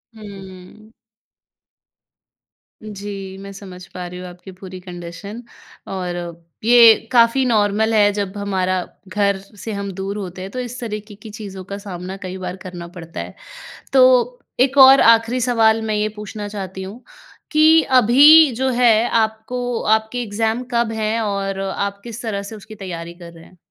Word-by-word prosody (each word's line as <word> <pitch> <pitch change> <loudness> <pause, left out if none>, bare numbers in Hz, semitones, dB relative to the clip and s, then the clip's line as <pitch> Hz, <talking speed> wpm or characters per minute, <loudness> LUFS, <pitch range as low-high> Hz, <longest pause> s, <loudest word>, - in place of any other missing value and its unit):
हम्म। 200 0 -12 1.9
जी, 200 -2 -7
मैं 200 +1 -9
समझ 185 -2 -11
पा 180 -1 -6
रही 180 +1 -9
हूँ 180 - -8
आपकी 180 +2 -12
पूरी 185 -1 -9
कंडीशन, 180 +4 -9 0.5
और 180 -2 -4 0.5
ये 235 0 +8 0.2
काफ़ी 235 +2 +4
नॉर्मल 220 -1 +1
है। 205 -1 +4
जब 200 -1 -4
हमारा 185 -2 -1 0.3
घर 200 +1 0
से 205 +3 -10
हम 200 -1 -4
दूर 195 +2 -5
होते 185 -2 -7
हैं, 190 +1 -7
तो 255 - -5
इस 250 0 -6
तरीके 210 -3 -6
की 210 +2 -12
चीज़ों 205 -3 -8
का 200 +2 -7
सामना 190 -2 -7
कई 185 -1 -7
बार 180 -1 -5
करना 180 -2 -9
पड़ता 170 -1 -10
है। - - -7 0.6
तो 250 -2 +4 0.2
एक 270 +2 +2
और 270 0 +9
आख़िरी 230 +2 +4
सवाल 225 -2 +2
मैं 215 - -1
ये 210 0 0
पूछना 210 0 -7
चाहती 190 -2 -7
हूँ 205 +6 -9 0.5
कि 315 +1 +6 0.2
अभी 290 +6 +7
जो 260 +3 -1
है 240 -2 +3
आपको 230 +2 -1 0.2
आपके 220 +3 -5
एग्ज़ाम 225 +2 -2
कब 235 -1 +1
हैं 220 +1 -1
और 200 -2 -2
आप 200 +1 -3
किस 235 0 -8
तरह 210 -4 -3
से 205 +2 -9
उसकी 215 +1 -12
तैयारी 170 -4 -7
कर 170 -1 -12
रहे 165 -1 -15
हैं? 185 - -20
205 Hz, 160 wpm, -19 LUFS, 190-230 Hz, 1.9 s, और